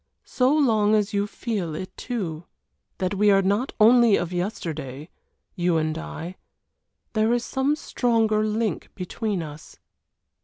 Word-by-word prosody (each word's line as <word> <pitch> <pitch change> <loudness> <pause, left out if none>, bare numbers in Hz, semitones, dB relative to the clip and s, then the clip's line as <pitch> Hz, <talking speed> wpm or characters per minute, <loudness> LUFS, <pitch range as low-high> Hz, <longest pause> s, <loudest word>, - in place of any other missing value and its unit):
"So 255 +1 +2
long 220 -8 +3
as 210 -1 0
you 200 0 +1
feel 205 -8 -3
it 185 - -7
too 175 -10 -4 0.5
that 185 0 -1
we 205 +1 +3
are 195 -1 +5
not 205 +8 +1
only 230 0 +6
of 175 +1 -2
yesterday, 160 -6 -4 0.4
you 175 -3 +1
and 155 0 0
I. 160 - -7 0.8
There 220 0 +2
is 240 0 0
some 275 +2 0
stronger 225 -7 +1
link 215 +1 -1
between 195 0 -3
us." 150 0 -11
205 Hz, 140 wpm, -24 LUFS, 175-225 Hz, 0.8 s, only